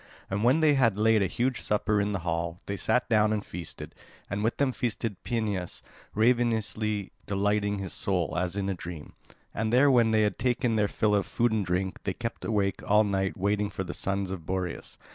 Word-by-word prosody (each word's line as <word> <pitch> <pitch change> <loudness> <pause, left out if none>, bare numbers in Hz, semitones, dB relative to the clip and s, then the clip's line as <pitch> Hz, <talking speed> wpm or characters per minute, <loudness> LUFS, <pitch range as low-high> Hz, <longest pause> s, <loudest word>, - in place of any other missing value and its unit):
And 100 +2 -1
when 130 +7 +4
they 155 -2 +5
had 115 -7 +3
laid 110 0 +4
a 95 - +2
huge 125 +6 -1
supper 105 0 +1
in 100 +1 -1
the 95 -3 -2
hall, 85 0 -2
they 100 - -3
sat 125 +5 +1
down 110 -1 +3
and 105 -2 -1
feasted, 85 -1 -8 0.4
and 100 +1 -1
with 115 - 0
them 140 -2 +2
feasted 115 -3 -2
Phineus 105 -6 -2 0.3
ravenously, 110 -3 +1 0.2
delighting 100 +1 +1
his 95 -2 -5
soul, 90 -6 -1
as 90 +1 -1
in 100 -1 -1
a 100 - 0
dream. 85 -3 -8 0.4
And 110 +1 -1
there, 135 +4 +5
when 120 -3 +4
they 110 -1 +3
had 105 -3 -1
taken 120 -2 +1
their 105 -1 +2
fill 105 +1 +1
of 100 -1 +1
food 120 0 +1
and 110 -2 +1
drink, 95 +1 -2
they 95 - -1
kept 115 -1 -5
awake 100 -3 0
all 105 +1 +4
night 95 -1 -1
waiting 100 +1 0
for 95 - -4
the - - -6
sons 100 -1 -2
of 95 -4 -5
Boreas. 90 +1 -4
105 Hz, 205 wpm, -28 LUFS, 95-110 Hz, 0.4 s, they